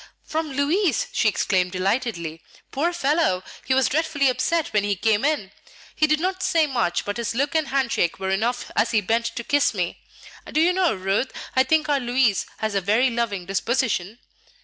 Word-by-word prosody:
"From 315 -2 -3
Louis!" 300 - +1
she 225 - +1
exclaimed 185 -2 0
delightedly. 185 -4 -2 0.3
"Poor 315 +6 0
fellow! 300 - +1 0.2
he 260 - +2
was 265 -1 +3
dreadfully 290 -2 +1
upset 325 +5 0
when 210 -1 +2
he 205 0 0
came 215 +3 +1
in. 285 -10 0 0.4
He 310 - +3
did 305 0 +2
not 370 +2 -2
say 340 -4 +3
much, 240 -11 -1
but 205 +2 -3
his 235 -1 -3
look 280 +3 0
and 315 -2 +1
hand 265 -2 0
shake 170 - 0
were 190 0 -2
enough 235 +6 -1
as 230 - +2
he 220 -3 +2
bent 230 +4 0
to 235 - -5
kiss 285 -3 +2
me. 180 -3 -2 0.5
Do 305 - +1
you 345 +3 +4
know, 365 - +2
Ruth, 195 +7 -1 0.2
I 260 - +5
think 305 +3 +2
our 290 -2 +2
Louis 245 -4 +1
has 220 -1 -2
a 195 - +1
very 220 +7 +2
loving 225 -6 -2
disposition?" 210 0 -1
245 Hz, 195 wpm, -23 LUFS, 200-300 Hz, 0.5 s, I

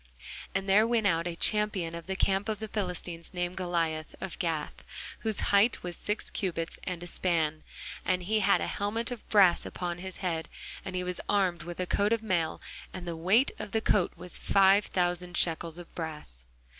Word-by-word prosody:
And 195 0 0
there 210 +3 +5
went 230 -2 +2
out 170 -3 +2
a 170 - -3
champion 210 -4 +1
out 170 - -4
of 170 - -15
the 190 - -2
camp 195 +2 +1
of 215 - -1
the 220 - -4
Philistines, 180 -4 -4
named 175 0 -1
Goliath, 165 -4 -1
of 190 - -6
Gath, 160 -3 -2 0.4
whose 220 -2 0
height 205 +4 +4
was 175 -1 -4
six 210 +1 -3
cubits 165 -4 -2
and 175 -2 -3
a - - -5
span. 160 -4 +1 0.4
And 180 -1 0
he 215 +4 +1
had 200 -1 +4
an - - -1
helmet 225 +4 -1
of 245 - -7
brass 195 -5 +6
upon 175 -1 -4
his 190 0 -6
head, 165 -4 -2 0.3
and 185 - -5
he 180 - -1
was 180 0 -2
armed 185 -5 +2
with 175 +2 -7
a 185 - 0
coat 205 +4 +2
of 230 -1 -1
mail; 175 -6 0 0.3
and 180 -1 -7
the 170 - -3
weight 190 +11 +3
of 205 - -6
the 220 - +2
coat 200 -4 +2
was 180 +1 -3
five 195 +1 +5
thousand 180 0 -1
shekels 165 0 +1
of 175 -1 -10
brass. 150 - -7
180 Hz, 200 wpm, -29 LUFS, 170-200 Hz, 0.4 s, brass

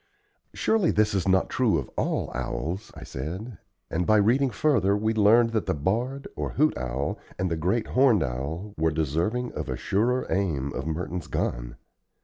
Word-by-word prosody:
"Surely, 220 -6 +2
this 105 -1 +2
is 95 -1 0
not 95 0 +3
true 115 -9 +2
of 70 - -3
all - - -1
owls," 95 +6 -4
I - - -9
said, 95 - -6 0.3
and 85 +2 -1
by 110 - +5
reading 125 +7 +3
further 105 -6 +2
we 110 +2 0
learned 115 +2 +5
that 110 -7 -1
the - - +1
barred, 120 - -1
or - - -3
hoot 155 +1 +2
owl, 65 +3 -3 0.2
and 95 -1 -1
the - - +1
great 95 +8 0
horned 125 -9 +4
owl, 75 +11 -4
were 80 0 +3
deserving 80 - -1
of - - -5
a 65 - -2
surer 120 +6 +1
aim 75 -9 0
of 70 - -4
Merton's 85 0 -3
gun. - - -3
95 Hz, 175 wpm, -26 LUFS, 80-115 Hz, 0.3 s, by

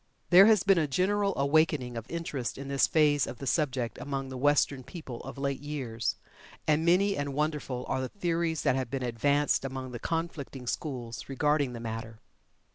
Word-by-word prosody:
There 190 +3 +9
has 215 -4 +5
been 195 -3 +4
a 155 - +1
general 195 +7 +1
awakening 140 -3 +2
of 115 -1 -6
interest 155 -7 -3
in 140 0 -7
this 140 -1 +3
phase 145 -3 +3
of 120 - -6
the 135 - -7
subject 130 -6 0
among 135 -1 -4
the 130 - -7
Western 140 -1 +2
people 135 -6 -8
of - - -9
late 140 -1 -2
years, 130 -6 -3 0.5
and 155 +1 +3
many 190 +4 +3
and 140 -1 -3
wonderful 150 -4 -2
are 130 - -1
the 130 - -3
theories 170 -4 -1
that - - +3
have 130 -3 -2
been 135 0 -3
advanced 140 +6 +1
among 130 -1 -5
the 120 - -6
conflicting 160 -5 -4
schools 120 -5 -4
regarding 145 -1 +1
the 120 - -6
matter. 115 0 -6
140 Hz, 185 wpm, -29 LUFS, 125-160 Hz, 0.5 s, There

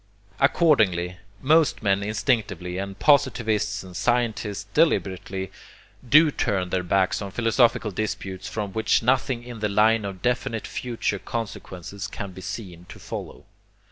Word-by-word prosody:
Accordingly, 110 - +3 0.3
most 155 -2 +3
men 100 -1 +2
instinctively, 105 -5 -1
and 100 0 -5
positivists 110 -8 +2
and 90 -1 -11
scientists 110 -3 0
deliberately, 95 - 0 0.6
do 155 +3 +7
turn 95 -9 -1
their 95 - +1
backs 95 +2 +1
on 100 - -4
philosophical 115 0 +2
disputes 95 -2 -4
from 105 -3 -4
which 110 +1 +2
nothing 125 0 +1
in 120 -2 -8
the 105 0 0
line 110 +2 +3
of 95 -2 -6
definite 125 -2 -1
future 115 -5 -3
consequences 100 -4 -6
can 100 -2 -6
be 95 - -10
seen 90 -5 -7
to - - -10
follow. - - -8
105 Hz, 135 wpm, -24 LUFS, 95-120 Hz, 0.6 s, do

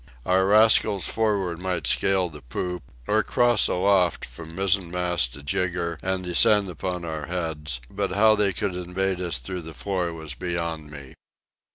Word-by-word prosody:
Our 95 +1 +2
rascals 105 -2 +4
for'ard 100 -6 -1
might 90 -4 -3
scale 95 +3 +2
the 75 -3 -11
poop; 90 +7 -4 0.2
or 110 +6 +2
cross 120 +2 +3
aloft 95 -1 +2
from 80 +7 -10
mizzenmast 90 -6 +1
to 75 - -11
jigger 85 +2 -2
and 95 0 -2
descend 90 - +4
upon 90 +1 -4
our 80 -2 -5
heads; 80 -6 -3
but 100 +2 -3
how 110 +2 +5
they 105 -2 +2
could 95 +1 -3
invade 90 +1 -2
us 85 -6 -1
through 90 +9 -5
the 80 -1 -10
floor 90 +4 -2
was 80 -3 -7
beyond 85 -3 -4
me. 70 -3 -11
90 Hz, 160 wpm, -24 LUFS, 80-95 Hz, 0.2 s, how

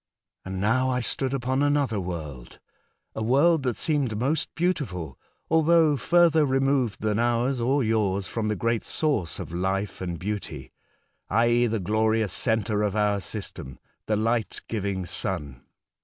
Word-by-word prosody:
And 95 0 -5
now 130 +6 +2
I 125 -1 0
stood 130 +2 -1
upon 130 0 -1
anotber 140 -8 +1
world 75 -8 -7 0.3
— - - -48
a - - -3
world 140 +8 +3
tbat 125 -4 -1
seemed 140 -9 -1
most 140 +7 0
beautiful, 105 - -2 0.3
altbougb 160 -2 +4
furtber 170 -3 +4
removed 135 -4 +1
tban 105 0 0
ours 120 +2 +1
or 135 +3 +2
yours 105 -4 0
from 110 +1 -2
tbe 105 - -1
great 115 +2 0
source 135 - -1
of - - -7
life 95 +3 -2
and 90 -2 -3
beauty, 90 -9 -5 0.6
i.e., 120 +3 +3
tbe 110 -4 -2
glorious 110 +1 +1
centre 110 -3 0
of 105 -1 0
our 105 -1 +2
system 85 - -6 0.2
— - - -50
tbe 105 - +1
ligbt 115 -1 -1
giving 100 -4 -2
Sun. 70 -5 -2
110 Hz, 155 wpm, -26 LUFS, 100-135 Hz, 0.6 s, altbougb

